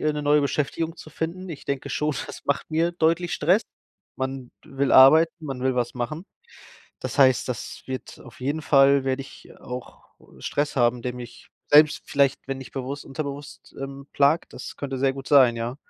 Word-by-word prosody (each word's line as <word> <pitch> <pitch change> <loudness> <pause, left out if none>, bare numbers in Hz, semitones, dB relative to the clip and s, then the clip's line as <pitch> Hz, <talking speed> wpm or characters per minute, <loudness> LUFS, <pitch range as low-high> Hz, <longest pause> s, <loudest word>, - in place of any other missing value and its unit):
äh, 155 0 +1
'ne 150 - -4
neue 145 0 +4
Beschäftigung 150 +4 -2
zu 155 - -12
finden. 170 +4 -5
Ich 155 -5 -8
denke 140 -2 -3
schon, 150 0 -1
das - - -10
macht 140 - -1
mir 165 +2 +1
deutlich 170 +1 +1
Stress. 180 +9 +3 0.5
Man 130 -1 -4
will 135 0 -2
arbeiten, 155 +5 +7
man 135 -2 -5
will 130 -1 +1
was 120 -1 -1
machen. 130 +8 -4 0.8
Das - - -5
heißt, 130 -3 +4
das 125 -3 -6
wird 130 -1 -7
auf - - -15
jeden 145 +5 -2
Fall 140 -1 +5
werde 135 0 -1
ich 135 - -15
auch, 125 0 -9 0.2
äh, - - -19
Stress 145 0 -2
haben, 120 -1 +2
der 125 0 -3
mich 120 -1 -11 0.2
selbst 150 0 +5
vielleicht, 140 -1 +1
wenn 135 -1 -4
nicht 135 - -10
bewusst, 135 +2 -5
unterbewusst, 140 0 -7
ähm, 135 0 -7
plagt, 145 +4 +2
das - - -9
könnte 135 -2 -4
sehr 135 0 +2
gut 135 0 -8
sein, 130 -5 +5
ja. 115 +2 -4
140 Hz, 190 wpm, -24 LUFS, 130-150 Hz, 0.8 s, arbeiten